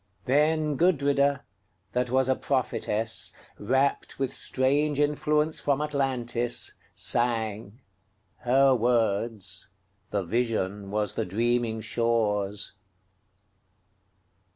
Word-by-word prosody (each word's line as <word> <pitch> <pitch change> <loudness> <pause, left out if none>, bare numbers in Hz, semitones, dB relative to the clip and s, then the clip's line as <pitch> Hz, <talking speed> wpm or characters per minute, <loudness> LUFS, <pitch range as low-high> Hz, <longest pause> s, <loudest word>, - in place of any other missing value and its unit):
Then 150 +2 +2
Gudrida, 140 -4 +2 0.5
that 125 0 -1
was 130 +1 +2
a 130 - +3
prophetess, 115 -5 -1 0.3
Rapt 130 +6 0
with 135 -1 -2
strange 145 +3 0
influence 150 +1 +1
from 140 -1 0
Atlantis, 130 -5 0 0.2
sang:Her 110 +2 0
words: 110 -5 0 0.4
the 100 -2 -1
vision 105 -2 -1
was 105 -1 -1
the - - -1
dreaming 115 +3 0
shore's. 105 -3 0
120 Hz, 80 wpm, -27 LUFS, 105-140 Hz, 0.5 s, a